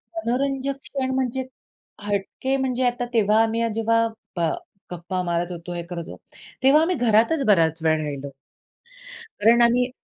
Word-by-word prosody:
मनोरंजक 275 -1 -1
क्षण 260 -2 -3
म्हणजे 260 0 -1 0.6
हटके 205 +6 -2
म्हणजे 260 -1 -1
आता 245 0 -1
तेव्हा 215 -1 +4
आम्ही 225 +1 -1
हा 230 - +2
जेव्हा 230 +1 +2 0.3
प 175 - -2 0.5
गप्पा 180 +1 -3
मारत 175 0 -1
होतो, 175 0 -7
हे 170 - -3
करत 170 -1 -7
होतो, - - -11 0.4
तेव्हा 280 +4 +6
आम्ही 350 +2 +1
घरातच 240 +6 +3
बराच 165 -4 +3
वेळ 155 -1 +2
राहिलो. 140 -1 -5 1.1
कारण 235 +3 +5
आम्ही 245 +1 +3
230 Hz, 150 wpm, -23 LUFS, 175-260 Hz, 1.1 s, तेव्हा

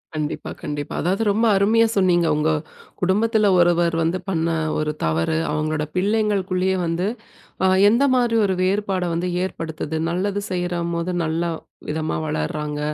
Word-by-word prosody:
கண்டிப்பா, 150 -1 -3
கண்டிப்பா. 145 -1 -4
அதாவது 190 +6 0
ரொம்ப 225 +3 +1
அருமையா 225 +3 +4
சொன்னீங்க, 175 -3 +3
உங்க, 150 +1 +1 0.5
குடும்பத்துல 210 +3 +2
ஒருவர் 175 -1 +3
வந்து 165 +3 0
பண்ண 165 -3 0 0.3
ஒரு 155 0 0
தவறு, 80 - 0
அவங்களோட 155 0 -1
பிள்ளைங்களுக்குள்ளயே 190 -2 +1
வந்து, 165 +2 -1 0.6
அ - - +5 0.2
எந்த 235 +6 +3
மாரி 240 -2 +2
ஒரு 190 - +1
வேறுபாட 195 -1 0
வந்து 175 +2 -1 0.2
ஏற்படுத்துது? 160 -3 -4
நல்லது 200 +3 -1
செய்ற 180 -1 -1 0.2
மோது 170 +2 -2
நல்லா 165 +2 -1 0.4
விதமா 155 - -2
வளர்றாங்க. 150 - -3
175 Hz, 135 wpm, -22 LUFS, 160-200 Hz, 0.6 s, அ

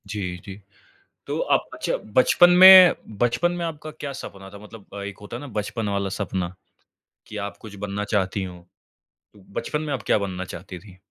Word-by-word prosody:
जी, 95 -3 -4
जी। 100 +1 -10 0.7
तो - - -3
आप - - +1
अच्छा - - -2 0.2
बचपन 175 +7 +6
में 185 0 +10 0.2
बचपन 120 +10 +1
में 175 -1 -4
आपका 155 -1 -7
क्या 150 -2 -7
सपना 95 -7 -10
था? 100 - -11
मतलब 105 -1 -14
एक 100 -1 -8
होता 105 +3 -8
है - - -7
ना 145 - -8
बचपन 105 +1 -3
वाला 100 -1 -1
सपना, 95 -3 -3 0.7
कि - - -8
आप 100 -2 -5
कुछ 105 -2 -11
बनना 100 +1 -4
चाहती 95 -1 0
हो? 90 -1 -8 0.8
तो 105 - -19 0.2
बचपन 150 - -3
में 150 -2 -3
आप 125 -6 -4
क्या - - +4
बनना 95 -2 -4
चाहती 90 0 -9
थी? 95 0 -16
105 Hz, 190 wpm, -23 LUFS, 95-145 Hz, 0.8 s, में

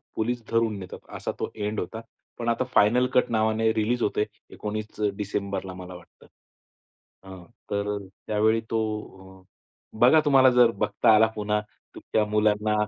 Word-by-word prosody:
Police 120 +1 -2
धरून 115 -2 +1
नेतात 90 -1 -9 0.2
असा - - -3
तो - - -2
एंड 105 0 -3
होता. 110 +6 -5 0.4
पण 115 - -1
आता 115 +2 +1
फायनल 120 +5 +4
कट 125 - +3
नावाने 110 0 +2
रिलीज 115 +2 0
होतय, 105 0 +1 0.2
19 110 0 -5 0.3
डिसेंबरला 100 -2 -3
मला 90 0 -9
वाटतं. 85 -1 -17 1.0
हां, 95 -2 -10 0.3
तर 100 0 -1 0.3
त्यावेळी 110 +1 +2
तो 115 -1 +1 1.2
बघा 130 +6 +7
तुम्हाला 135 -2 +6
जर 120 -2 +6
बघता 105 +2 +4
आला 110 +1 +5
पुन्हा. 105 0 0 0.4
तुमच्या 110 -1 -1
मुलांना 105 0 +2
110 Hz, 140 wpm, -25 LUFS, 105-115 Hz, 1.2 s, बघा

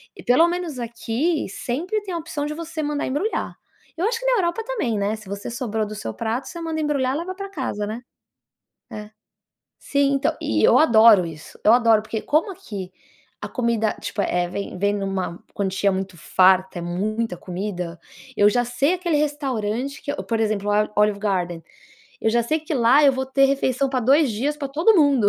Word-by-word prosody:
e - - -12
pelo 320 +8 +5
menos 345 -6 -3
aqui 235 +7 -1
sempre 315 - -3
tem 380 -3 -6
a - - -1
opção 305 -3 -4
de 300 - -3
você 325 0 -5
mandar 295 0 -2
embrulhar. 300 +12 -2 0.4
Eu 350 - 0
acho 465 +1 0
que - - -8
na - - +3
Europa 370 +4 0
também, 410 - -1
né? 205 +2 0
Se 210 -3 -12
você 200 +3 -5
sobrou 225 -3 -2
do 210 - -7
seu 110 - -5
prato 230 +3 -3
você 340 - -7
manda 325 -1 -3
embrulhar 280 -4 0
e - - 0
leva 370 +2 -5
para 395 +1 -6
casa, 260 - -3
né? 220 +3 -5 0.9
É. 210 0 -8 0.7
Sim. 280 0 +1
Então, 275 +1 +1
e - - 0
e - - +1
eu - - +6
adoro 225 - +6
isso, 160 -2 -10
eu 215 - +6
adoro 230 -3 +5
porque 215 0 -4
como 315 +7 +1
aqui 200 - -8 0.5
a - - -4
comida, 235 -3 0
tipo, 205 - -3
eh, 175 -2 0
vem 200 0 -5
vem 205 +2 +1
em 200 - -3
uma 190 -3 -3
quantia 195 0 0
muito 190 -1 -4
farta, 185 +2 +3
é - - -5
muita 200 +4 -2
comida, 180 -2 -5 0.4
eu 205 0 +5
já 245 +2 +1
sei 260 +7 +1
aquele 350 -3 -1
restaurante 275 -4 -2
que 285 - -3
por 225 -1 -2
exemplo, 210 -2 0
o 210 0 +2
Olive 210 -1 +2
Garden, 180 -5 -2 0.6
eu 220 - +3
já 235 +1 +2
sei 310 +7 0
que 315 +2 -6
lá 255 +4 +5
eu 275 - +6
vou 265 0 -3
ter 275 +1 +3
refeição 275 -1 +1
para 260 -1 0
2 275 +4 +4
dias 270 +8 -1
para 285 -2 -4
todo 320 +11 +3
mundo. 280 - +4
235 Hz, 205 wpm, -22 LUFS, 205-295 Hz, 0.9 s, eu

